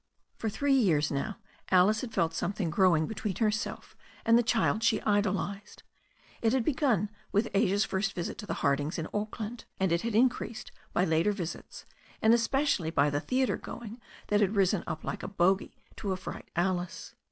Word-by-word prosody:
For 225 - -2
three 275 +7 +1
years 170 - +3
now 170 +10 -2 0.3
Alice 190 +4 +4
had 250 - -5
felt 165 -5 +1
something 180 0 -2
growing 170 -3 +4
be 220 - -5
tween 200 -2 -3
herself 215 -1 -2 0.3
and 230 - +5
the 240 - +6
child 225 -1 +1
she 230 - +3
idolized. 205 0 -1 0.6
It 225 0 +2
had 260 -3 +1
begun 245 - +1 0.2
with 210 +3 +1
Asia's 200 0 +3
first 195 0 -1
visit 175 - -4
to 210 - -7
the - - -2
Hardings 145 +4 +1
in 165 -1 -3
Auckland, 215 +2 -4
and 190 -2 +1
it 170 0 +2
had 230 -1 -2
been 220 - +5
increased 235 -3 -2 0.2
by 180 - +2
later 165 +5 +2
visits, 180 -5 -6 0.3
and 220 +1 +5
especially 235 - +1
by 145 -3 +2
the 145 - 0
theatre 255 +6 0
going 235 0 -8 0.3
that 210 0 +3
had 205 +1 +2
risen 195 -1 +2
up 155 - -4
like - - -4
a - - -5
bogy 190 0 +1 0.2
to 200 - -3
affright 185 0 -7
Alice. 175 0 -2
205 Hz, 185 wpm, -29 LUFS, 175-225 Hz, 0.6 s, the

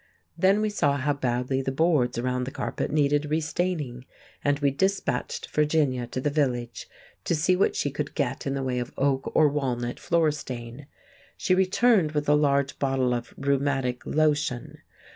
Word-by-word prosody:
Then 190 +5 +3
we 215 -1 0
saw 145 -8 +1
how 145 +2 0
badly 130 0 -1
the 135 - -2
boards 145 -5 +2
around 125 +1 -1
the - - -4
carpet - - -3
needed 145 0 +2
re 155 +1 +1
staining, 150 -6 -3 0.4
and 145 0 +2
we 140 -1 +1
dispatched 190 +8 -1
Virginia 150 -5 +1
to 125 - -4
the 145 +3 -1
village 125 -5 -1 0.3
to - - 0
see 180 +4 +2
what 185 - +2
she 145 - -1
could 145 +1 -4
get - - -2
in 135 - -1
the 135 - -2
way 125 -1 -1
of 120 - -4
oak 135 -1 0
or 155 - +6
walnut 125 -4 -2
floor 165 -3 +2
stain. 125 -2 -7 0.5
She 185 - +1
returned 190 -2 +3
with 150 -1 -1
a 145 - +5
large 140 -2 +2
bottle 135 -2 +1
of 120 0 -5
rheumatic 135 -3 0
lotion. 150 -5 0
140 Hz, 175 wpm, -26 LUFS, 130-155 Hz, 0.5 s, or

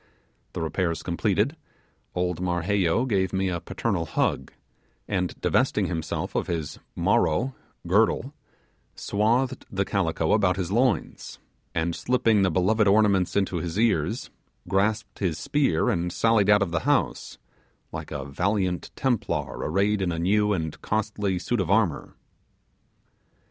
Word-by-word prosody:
The 85 - -3
repairs 85 0 -1
completed, 105 - 0 0.6
old 90 -1 -1
Marheyo 90 +4 +1
gave 95 -5 +1
me 95 0 0
a 85 -1 -2
paternal - - -2
hug; 65 - -1 0.6
and 90 -3 -2
divesting - - +2
himself 80 -3 -3
of - - -1
his 80 -4 -4 0.2
'maro' 120 +12 +1 0.3
(girdle), 110 +8 +2 0.6
swathed 120 +5 0
the 95 0 -1
calico 85 -5 0
about 95 -4 +2
his 95 -2 -3
loins, 120 0 0 0.4
and 80 +1 0
slipping 120 -4 +2
the 95 - +3
beloved 100 +5 +2
ornaments 100 -3 +3
into 95 -2 +1
his 85 +2 -4
ears, 115 +1 0 0.4
grasped 105 +3 0
his 90 -5 -1
spear 135 - +1
and 85 +1 -1
sallied 110 0 +2
out 105 -1 +6
of 90 - -4
the 85 - +1
house, - - 0 0.5
like - - -6
a - - -5
valiant 90 +4 -1
Templar 125 -5 -1
arrayed 100 +5 +1
in 90 -2 0
a 85 - -3
new 105 +5 +2
and 80 -6 -3
costly 105 -3 -1
suit 120 +7 -1
of 90 - -3
armour. 100 -6 +1
95 Hz, 135 wpm, -25 LUFS, 85-105 Hz, 0.6 s, out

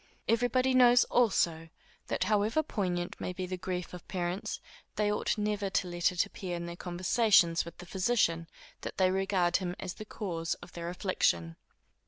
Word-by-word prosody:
Every 230 +2 +3
body 255 +2 +2
knows, 245 -1 +7
also, 170 -9 +1 0.4
that - - 0
however 215 +8 +2
poignant 180 - -3
may 180 - -3
be 185 0 -4
the 185 +1 -4
grief 180 -1 -4
of 180 - -10
parents, 180 0 -3 0.4
they 210 -1 +1
ought 210 - 0
never 210 -1 -1
to 190 - 0
let 175 0 +1
it 180 +1 +1
appear 190 -3 -5
in 170 0 -4
their 170 0 -6
conversations 180 0 +3
with 170 - -10
the 180 - -10
physician, 180 -3 +1 0.3
that - - -6
they 185 -1 +4
regard 190 -2 +2
him 180 -2 -4
as 180 - -4
the 215 - -9
cause 170 -6 -3
of 180 - -14
their 170 0 -5
affliction. 85 - 0
185 Hz, 180 wpm, -31 LUFS, 175-210 Hz, 0.4 s, knows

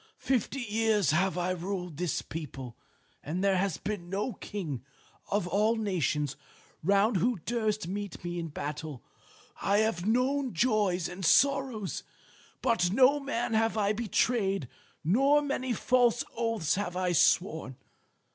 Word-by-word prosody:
Fifty 265 +1 -1
years 220 - +2
have 180 +2 +1
I 180 +1 0
ruled 180 -3 -4
this 175 -2 -1
people, 135 -6 -7 0.5
and 175 +6 -3
there 195 -1 +3
has 190 -3 0
been 195 -4 -5
no 205 +6 -2
king 165 - -5 0.5
of 200 -3 0
all 210 +5 +2
the 220 - -3
nations 150 -7 0 0.5
round 200 +5 +3
who 235 +5 +1
durst 215 -5 -1
meet 200 -1 -5
me 175 0 -3
in 165 - -3
battle. 150 -2 -6 0.6
I 200 +1 +2
have 210 -4 +1
known 255 +1 +1
joys 200 -5 +2
and 180 +2 -8
sorrows, 265 - +2 0.6
but 225 -8 +2
no 265 +6 +5
man 240 -4 -2
have 225 0 +2
I 205 0 +2
betrayed, 210 - 0 0.4
nor 270 - +4
many 270 -3 -2
false 245 0 +2
oaths 230 -9 0
have 185 -3 -2
I 185 -1 +1
sworn. 170 -5 +2
200 Hz, 140 wpm, -29 LUFS, 175-230 Hz, 0.6 s, no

